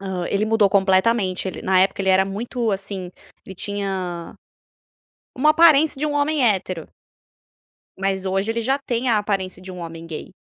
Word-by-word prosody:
Hã, 190 -3 -4
ele 200 +1 0
mudou 220 -2 +3
completamente, 190 0 +2
ele - - -7
na 185 -1 +3
época 195 +1 +1
ele 190 - -1
era 190 0 +4
muito, 225 +4 -3
assim, 195 -2 -4 0.3
ele 190 - -10
tinha, 190 -3 -3 1.0
uma 300 +4 +4
aparência 310 -3 +5
de 305 - 0
um 295 - -2
homem 290 0 +1
hétero 185 -6 0 1.1
mas 195 0 -2
hoje 195 +3 -1
ele 230 +1 -1
já 265 +5 0
tem 250 -2 -2
a 225 -3 +3
aparência 195 -3 -3
de 185 - -8
um 180 - -9
homem 165 -1 -8
gay. 160 -2 -7
195 Hz, 170 wpm, -21 LUFS, 185-230 Hz, 1.1 s, aparência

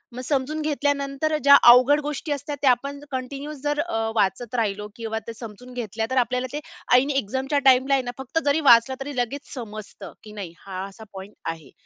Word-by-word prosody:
मग 250 - -5
समजून 285 +3 -1
घेतल्यानंतर 285 0 -1
ज्या 280 0 +9
अवघड 255 +5 +7
गोष्टी 295 +1 -4
असतात. 290 +1 -3
त्या 270 -3 +6
आपण 280 +3 -2
कंटिन्यूस 275 +3 -5
जर 290 +1 -1
अ, 335 -2 -2 0.2
वाचत 225 +3 0
राहिलो 210 -3 -1
किंवा 220 -1 -4
ते 230 - -5
समजून 230 +2 -10
घेतल्या, 225 -2 -3
तर 260 - -2
आपल्याला 250 +2 -3
ते 295 - -2 0.4
ऐन 260 +3 +4
एक्झामच्या 270 +2 0
टाईमला 265 +1 +5
आहे 270 -1 +2
ना, 245 - -4
फक्त 265 +4 -2
जरी 285 +2 +3
वाचलं. 235 +2 +6
तरी 275 +1 -6
लगेच 250 +4 -3
समजतं, 215 -5 -8
की 215 - -11
नाही 200 -5 -7
हा 190 -1 -5
असा 200 +3 -13
पॉइंट 195 +2 -9 0.2
आहे. 160 -2 -12
255 Hz, 190 wpm, -24 LUFS, 225-285 Hz, 0.4 s, ज्या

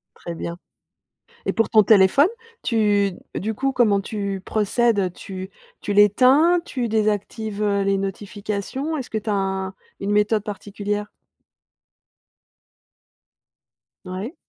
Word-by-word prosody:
Très 170 - -7
bien. 170 +1 -5 0.9
Et - - +1
pour 225 - +1
ton 215 -2 +6
téléphone 210 - +5 0.3
tu 205 -4 +2 0.2
du 220 +3 -2
coup 270 +3 -1
comment 210 -6 +3
tu 200 -2 -4
procèdes, 220 +1 +1
heu? 185 -2 +1
Tu 190 +1 -8 0.3
tu 205 - -2
l'éteins, 260 - +5
tu 245 -3 -3
désactives, 215 0 -1
heu, 200 -1 +1
les 195 0 +1
notifications? 205 +9 -4
Est-ce 260 - -6
que 220 - -1
tu 215 - -8
as - - +1
un 190 -1 -2 0.3
une 200 +1 -2
méthode 210 0 +2
particulière? 205 0 -4 3.0
Ouais. 195 - -5
205 Hz, 125 wpm, -22 LUFS, 195-225 Hz, 3.0 s, ton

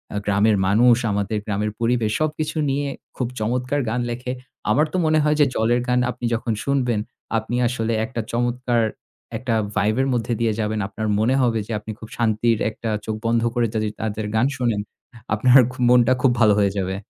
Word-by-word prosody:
আ - - 0
গ্রামের 105 +1 +3
মানুষ, 115 +4 +5
আমাদের 100 +1 -1
গ্রামের 105 0 -1
পরিবেশ, 115 -2 +1
সবকিছু 155 +1 -2
নিয়ে 140 +1 -1 0.3
খুব 125 - -1
চমৎকার 125 +5 -1
গান 125 +2 -1
লেখে। 125 +1 -4 0.4
আমার 150 - +3
তো - - +1
মনে 155 0 +3
হয় 150 0 +2
যে, 145 - +6
জলের 120 +2 +2
গান 125 0 +2
আপনি 120 - -7
যখন 115 0 -1
শুনবেন, 125 -5 0 0.4
আপনি 110 +2 -3
আসলে 115 -2 -1
একটা 115 +1 -4
চমৎকার 120 0 0 0.6
একটা 125 -3 -2 0.2
ভাইব 105 +2 +2
এর 135 - +1
মধ্যে 120 0 -1
দিয়ে 115 -2 +2
যাবেন। 110 0 -1
আপনার 110 +1 -4
মনে 120 +5 +2
হবে 115 -3 +2
যে, - - -7
আপনি 110 +1 -7
খুব 110 - -10
শান্তির 115 0 +2
একটা 110 +1 -6 0.2
চোখ 110 - -2
বন্ধ 115 0 +2
করে 120 -1 +2
যদি 110 -1 0
তাদের 110 -1 -3
গান 110 +4 +3
শোনেন, 120 -5 0 0.5
আপনার 125 +4 +6
খ - - -11 0.2
মনটা 125 0 +5
খুব 130 - +4
ভালো 105 -2 +6
হয়ে 100 -1 +3
যাবে। 95 -1 -1
115 Hz, 190 wpm, -22 LUFS, 110-125 Hz, 0.6 s, যে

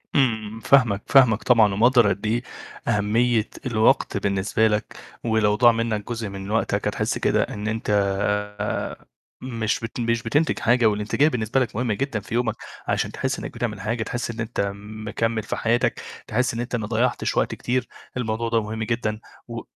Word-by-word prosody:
إمم، 110 -5 +1
فاهمك، 115 -5 +4
فاهمك 125 -5 +5
طبعًا 110 -5 +5
ومقدّر 120 +1 +5
قد 100 +2 -2
إيه 115 +3 0 0.4
أهمية 110 +2 +2 0.2
الوقت 110 -3 +2
بالنسبة 100 +3 +1
لك، 105 0 -2 0.3
ولو 110 -2 +2
ضاع 120 +1 +6
منّك 115 -2 -2
جزء 115 -3 -3
من 100 +1 -7
وقتك 115 +1 0
هتحس - - -1
كده - - +2
إن 105 +1 -5
أنت 110 0 -3 1.5
مش 115 -4 -1
بت 115 +2 -6
مش 115 0 0
بتنتج 145 +7 +1
حاجة، 120 0 +3
والانتجاية 105 +8 +2
بالنسبة 120 -2 0
لك 125 -5 -1
مهمة 120 -1 0
جدًا 130 0 -2
في 100 - -9
يومك 115 -2 +1 0.3
عشان - - 0
تحس - - -2
إنّك - - -6
بتعمل 105 -5 -3
حاجة 110 +2 -1
تحس 120 +1 -3
إن 115 - -10
أنت 110 -3 -1
مكمّل 110 +2 -3
في - - -3
حياتك، 115 +1 +1 0.3
تحس 125 +3 0
إن 115 - -4
أنت 120 +1 -2
ما 110 -3 -3
ضيّعتش 120 +2 0
وقت - - +1
كتير، 125 0 -1 0.3
الموضوع 115 -1 -1
ده 115 -1 +2
مهم 110 +1 -4
جدًا 110 -2 -2 0.3
و 115 -1 -5
115 Hz, 170 wpm, -23 LUFS, 105-120 Hz, 1.5 s, ضاع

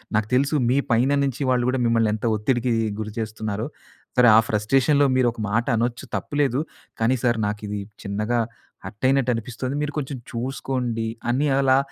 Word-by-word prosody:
నాకు 110 -1 +1
తెలుసు 140 +4 +2
మీ 130 - +3
పైన 120 +4 +3
నుంచి 135 0 -2
వాళ్ళు 125 -1 +2
గూడా 130 0 +1
మిమ్మల్ని 115 -2 +3
ఎంత 110 +2 -4
ఒత్తిడికి 120 +3 0 0.3
గురి 110 0 -4
చేస్తున్నారో. 110 -1 -3 0.5
సరే 125 -1 +7
ఆ - - +8
ఫ్రస్ట్రేషన్‌లో 135 +7 +3
మీరు 130 -1 +3
ఒక 115 - -13
మాటనొచ్చు 120 +2 0
తప్పు 145 - -4
లేదు. 135 -2 +1 0.4
కానీ 120 +4 +3
సార్ 120 -2 +2
నాకిది 105 0 -4 0.2
చిన్నగా 105 +4 -1 0.5
హర్టయినట్లనిపిస్తుంది. 125 +3 -1
మీరు 150 -1 -2
కొంచెం 140 -2 -3
చూసుకోండి 125 -2 -2 0.2
అని 145 +4 +1
అలా 135 -1 +4
120 Hz, 150 wpm, -23 LUFS, 110-130 Hz, 0.5 s, ఆ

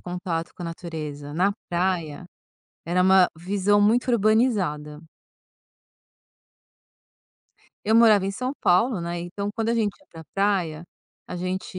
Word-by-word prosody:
contato 175 -2 -4
com 180 - -9
a - - -4
natureza 155 -4 -7
na 190 +5 +2 0.2
praia 175 -3 -1 0.6
era 180 +2 +1
uma 190 -1 +5
visão 200 +3 +1
muito 240 +5 +3
urbanizada. 200 -10 +1 2.8
Eu 220 +2 +2
morava 215 -4 +6
em - - -1
São 255 +6 -3
Paulo, 190 +4 +2
né, 170 0 -4
então 200 +4 -4
quando 225 -1 -1
a 235 - +1
gente 215 -3 -1
ia 290 - -26
pra 165 -1 -10
praia, 185 -5 0 0.4
a - - -7
gente 185 +1 -4
185 Hz, 130 wpm, -24 LUFS, 170-205 Hz, 2.8 s, morava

